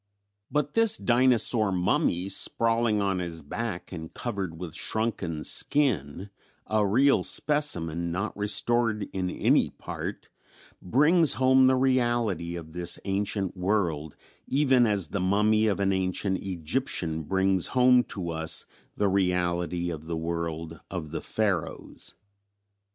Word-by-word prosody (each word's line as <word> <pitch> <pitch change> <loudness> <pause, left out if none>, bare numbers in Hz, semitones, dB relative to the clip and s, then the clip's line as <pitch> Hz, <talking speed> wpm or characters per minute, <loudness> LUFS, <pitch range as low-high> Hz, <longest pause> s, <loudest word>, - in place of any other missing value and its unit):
But 150 -1 -1
this 225 -1 +5
"dinosaur 120 -3 +2
mummy" 90 0 0
sprawling 115 +1 +2
on 95 -2 0
his 85 -3 -5
back 100 +4 -5
and 80 -3 -7
covered 95 -8 -4
with 85 -2 -7
shrunken 90 -7 -2
skin 100 - +1 0.3
a 110 -1 +1
real 135 +8 +3
specimen, 85 - +1
not 100 +5 -3
restored 105 +1 0
in 95 -1 -2
any - - +2
part - - -7 0.5
brings 150 - +4
home 130 0 +4
the 130 - +4
reality 120 -9 0
of 80 -2 -9
this 85 0 -1
ancient 100 -1 -2
world 90 -6 -1 0.3
even 130 -3 +3
as 100 -6 0
the 100 - -3
mummy 105 +4 +2
of 100 -2 0
an 100 -1 +1
ancient 95 +1 -1
Egyptian 85 - -3
brings 95 +2 +1
home 125 0 +5
to 90 -4 -5
us 80 0 0 0.3
the 105 - +2
reality 90 -2 0
of 80 -1 -8
the 85 -1 -3
world 80 -1 -4
of 80 -5 -6
the 80 - -4
Pharaohs. 100 -7 -3
95 Hz, 130 wpm, -27 LUFS, 85-115 Hz, 0.5 s, this